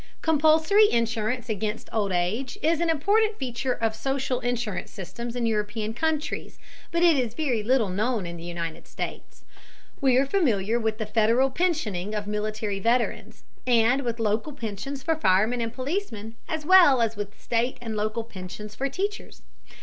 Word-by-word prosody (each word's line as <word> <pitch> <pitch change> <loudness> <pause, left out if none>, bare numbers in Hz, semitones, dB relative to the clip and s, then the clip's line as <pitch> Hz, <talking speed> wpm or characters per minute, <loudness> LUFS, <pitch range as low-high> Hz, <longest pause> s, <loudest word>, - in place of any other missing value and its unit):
Compulsory 320 +7 +5
insurance 230 +1 0
against 215 0 -3
old 210 -3 0
age 190 - -1
is 325 +1 +2
an 340 - +1
important 415 +8 +2
feature 255 0 -2
of 225 -1 0
social 265 +1 -1
insurance 240 -7 -2
systems 235 +5 -7
in 245 -1 -1
European 215 0 -1
countries, 310 +3 -2 0.3
but 340 0 +1
it 340 -3 +6
is 245 -4 -1
very 255 -7 0
little 230 -1 +2
known 215 +2 0
in 170 0 -6
the 165 - -9
United 170 -1 -5
States. - - -7 0.6
We 260 -2 +4
are 270 - +4
familiar 235 - +1
with 220 -1 -1
the 220 - -3
Federal 230 +5 +3
pensioning 215 - -1
of 210 -1 -2
military 210 -1 -2
veterans, 235 +4 0 0.2
and 245 +2 +4
with 235 -3 -3
local 220 +6 0
pensions 260 +2 -5
for 325 - +2
firemen 220 -1 +2
and 230 -1 -2
policemen, 255 - -4 0.2
as 315 -1 -3
well 345 -7 +7
as 225 -1 +1
with 205 +1 -6
state 235 +2 0
and 225 -2 -5
local 215 +2 -1
pensions 210 0 -9
for 270 +6 -2
teachers. 400 +8 -4
235 Hz, 165 wpm, -26 LUFS, 215-275 Hz, 0.6 s, well